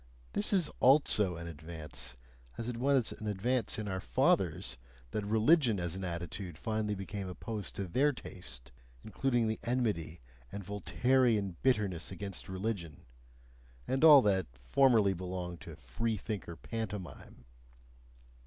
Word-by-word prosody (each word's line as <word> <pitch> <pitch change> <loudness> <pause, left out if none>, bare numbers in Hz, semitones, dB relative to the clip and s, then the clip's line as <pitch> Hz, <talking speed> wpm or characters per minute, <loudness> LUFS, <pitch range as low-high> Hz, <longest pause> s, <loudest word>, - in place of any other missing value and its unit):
This 100 - +2
is 185 -6 +3
ALSO 125 - +5
an 85 0 -7
advance, 75 -5 -7 0.4
as 115 - -4
it 120 -1 -3
was 130 -1 +2
an 110 - -7
advance 110 +3 0
in 110 -1 -4
our 95 -1 -2
fathers - - +1 0.3
that 105 - -2
religion 110 - +4
as 85 -2 -2
an 95 - -5
attitude 85 0 -5
finally 110 0 -1
became 95 0 -5
opposed 105 +3 -5
to 100 - -3
their 135 +11 +3
taste, 70 - -9 0.3
including 120 +2 0
the 110 - -2
enmity 105 -10 -1 0.3
and 100 - -6
Voltairean 105 -1 +1
bitterness 100 -10 +1
against 95 +1 -6
religion 95 -6 -4 0.8
(and 135 +3 0
all 150 -4 +10
that 95 -4 +2
formerly 100 - +3
belonged 90 -1 -5
to - - -9
freethinker 105 -6 -3
pantomime). 105 - -6
100 Hz, 130 wpm, -32 LUFS, 90-115 Hz, 0.8 s, all